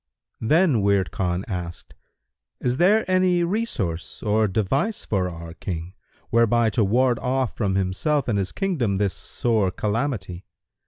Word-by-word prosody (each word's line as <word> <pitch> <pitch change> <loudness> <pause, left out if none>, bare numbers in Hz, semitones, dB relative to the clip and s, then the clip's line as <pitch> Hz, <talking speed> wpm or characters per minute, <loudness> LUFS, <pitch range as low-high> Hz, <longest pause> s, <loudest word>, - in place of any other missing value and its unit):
Then 150 - +3
Wird 100 -5 +2
Khan 90 +1 -2
asked, 90 -4 -6 0.7
"Is 125 0 -1
there 205 +7 +4
any 185 -1 +3
resource 160 - -3
or 110 0 +2
device 135 - -1
for 95 -3 0
our 85 -1 -8
King, 85 0 -5 0.4
whereby 115 -1 +3
to 115 - +2
ward 120 +5 +2
off 130 -1 -1
from 100 -4 0
himself 100 - 0
and 105 -4 +1
his 95 -1 -2
kingdom 135 - -1
this 100 -2 +1
sore 110 -5 0
calamity?" 105 -3 -3
110 Hz, 140 wpm, -23 LUFS, 95-135 Hz, 0.7 s, there